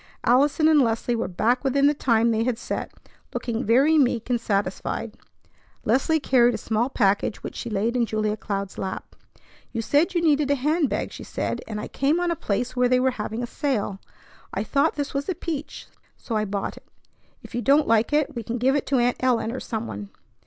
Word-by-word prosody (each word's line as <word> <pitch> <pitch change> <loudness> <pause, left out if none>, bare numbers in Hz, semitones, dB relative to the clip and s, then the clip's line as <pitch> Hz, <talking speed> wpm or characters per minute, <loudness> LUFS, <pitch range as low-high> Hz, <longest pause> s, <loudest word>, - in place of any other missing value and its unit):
Allison 285 +5 +4
and 310 -2 +6
Leslie 235 0 0
were 230 - -1
back 235 +7 +1
within 275 +1 +2
the 290 - +5
time 235 -5 +2
they 225 0 +1
had 245 -1 0
set, - - -4 0.4
looking 235 0 -2
very 275 +8 +4
meek 245 -3 +1
and 240 -1 +1
satisfied. 205 +1 -2 0.7
Leslie 315 +4 +2
carried 245 -4 +3
a - - -2
small 225 +3 -1
package, 205 -4 +1
which - - -6
she 235 - -5
laid 220 +3 0
in 240 -2 +2
Julia 215 -1 -1
Cloud's 200 -2 -4
lap. 190 - -5 0.6
"You 230 -1 -3
said 320 - +2
you 345 - +2
needed 295 -3 +3
a 285 - +4
hand 300 +2 +1
bag," - - -2
she - - -9
said; - - -3
"and 215 -1 -4
I - - -5
came 290 +5 +1
on 350 -1 0
a - - 0
place 245 -1 -2
where 250 0 +3
they 250 0 +4
were 260 +1 +2
having 225 0 -4
a - - 0
sale. 235 -7 -2 0.5
I 195 - -2
thought 280 +6 +1
this 290 -1 -3
was 280 +3 -2
a 375 - 0
peach; 305 -2 -5 0.3
so 230 - -5
I 215 0 +1
bought 200 -1 -3
it. - - -16 0.6
If - - -12
you 240 - -1
don't 280 +6 +4
like 225 +2 +3
it, 300 0 +1
we 235 - -3
can 230 +2 -4
give 260 +3 +2
it 290 - -1
to 275 - +1
Aunt 245 0 +2
Ellen 245 -3 +1
or 260 - -4
some 220 -3 -4
one." 105 -2 -7
245 Hz, 215 wpm, -24 LUFS, 220-280 Hz, 0.7 s, and